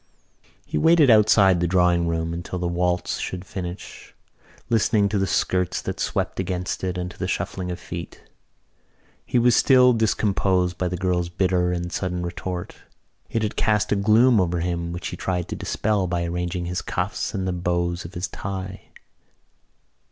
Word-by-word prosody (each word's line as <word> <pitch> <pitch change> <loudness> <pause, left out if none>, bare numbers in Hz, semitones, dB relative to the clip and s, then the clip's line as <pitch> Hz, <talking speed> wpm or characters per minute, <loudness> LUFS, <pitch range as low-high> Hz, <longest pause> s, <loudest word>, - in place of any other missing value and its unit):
He - - -2
waited 160 -5 +5
outside 100 -4 +5
the 85 - +1
drawing 90 -1 +3
room 80 0 -1
door 85 - -3
until 85 +1 -5
the 90 0 -2
waltz 90 +1 -1
should 90 0 -5
finish, 90 -1 -8 0.5
listening 110 -2 +2
to 100 -1 0
the 95 - +1
skirts 90 +2 0
that - - -4
swept - - -2
against 90 -1 -3
it 90 -1 -2
and 90 0 -4
to - - -16
the - - -2
shuffling 90 -1 -3
of 90 0 -4
feet. - - -8 1.0
He - - +1
was 120 0 +4
still 125 -2 +6
discomposed 95 -5 +1
by 90 - 0
the 90 +1 -3
girl's 90 -1 0
bitter 90 0 +1
and 90 0 -3
sudden 90 -2 -2
retort. 90 +1 -5 0.5
It 115 - -1
had 105 - -2
cast 105 -2 +1
a - - +4
gloom 110 +3 +4
over 90 -1 0
him 85 -1 -2
which 85 +1 -5
he - - -7
tried 90 -2 -2
to - - -3
dispel 105 -3 -1
by 85 -1 -1
arranging 90 +1 -3
his 90 +1 -2
cuffs - - -3
and 95 -1 -2
the 90 - -1
bows 85 0 -1
of 85 +3 -10
his 90 +1 -2
tie. 95 0 -6
90 Hz, 175 wpm, -23 LUFS, 90-100 Hz, 1.0 s, still